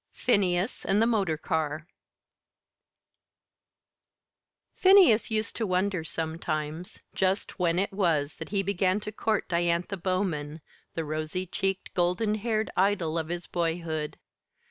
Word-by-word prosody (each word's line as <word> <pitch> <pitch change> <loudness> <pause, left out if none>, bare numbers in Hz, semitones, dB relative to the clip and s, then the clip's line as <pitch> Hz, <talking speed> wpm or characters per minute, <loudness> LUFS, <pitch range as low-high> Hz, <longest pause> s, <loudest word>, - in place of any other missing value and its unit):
Phineas 195 -3 +1
and 195 - +2
the 225 - +4
Motor 200 -9 +1
Car 155 -1 -2 2.9
Phineas 370 - +6
used 220 0 -1
to 225 - -1
wonder, 185 -1 0
sometimes, 160 0 -4
just 190 +1 -1
when 170 -1 +2
it 195 +2 0
was 160 -7 +1
that 160 - -7
he 195 -1 0
began 190 0 +1
to 210 - -5
court 215 -1 -1
Diantha 170 +3 0
Bowman, 170 -5 -2 0.3
the 165 - -2
rosy 155 +4 -3
cheeked, 195 +1 -2
golden 180 +5 +1
haired 215 0 -1
idol 185 -4 +1
of 160 -1 -1
his 175 +1 -4
boyhood. 165 -3 -2
180 Hz, 120 wpm, -28 LUFS, 160-200 Hz, 2.9 s, Phineas